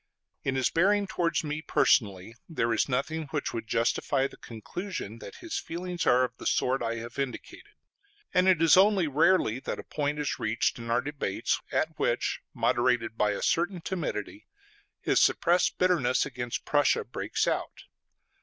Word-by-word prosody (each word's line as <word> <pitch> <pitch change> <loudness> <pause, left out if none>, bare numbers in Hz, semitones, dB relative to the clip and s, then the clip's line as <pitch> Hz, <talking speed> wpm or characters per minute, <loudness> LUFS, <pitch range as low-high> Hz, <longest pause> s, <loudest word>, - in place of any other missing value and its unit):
In 135 - -1
his 130 -1 +1
bearing 200 +4 +3
towards 170 -3 -1
me 150 0 -3
personally 100 -8 +1 0.2
there 115 -8 0
is 115 - +1
nothing 155 +4 -2
which 150 0 -3
would 115 -2 -5
justify 120 +4 +1
the - - -6
conclusion 115 - -7
that - - -10
his 340 -2 -4
feelings 175 +1 -4
are 125 +1 +5
of 125 0 -3
the - - -5
sort 130 +1 +1
I 115 0 -1
have 120 +3 -7
indicated; 135 -2 -6 0.6
and 180 +1 +3
it 180 -4 +4
is 165 - +7
only 190 -2 +4
rarely 150 -4 +3
that - - -4
a - - -7
point 145 0 -2
is 150 -2 -2
reached 110 +2 0
in 115 0 -7
our 120 +2 +2
debates 140 -8 -2
at - - -1
which, - - 0
moderated 120 -2 +1
by 105 -2 +1
a - - -4
certain 175 +2 +1
timidity, 190 - -4 0.5
his - - +2
suppressed 175 +2 +3
bitterness 175 -9 +2
against 120 -3 -5
Prussia 145 -1 +2
breaks 120 - -2
out. - - -2
140 Hz, 165 wpm, -28 LUFS, 120-170 Hz, 0.6 s, is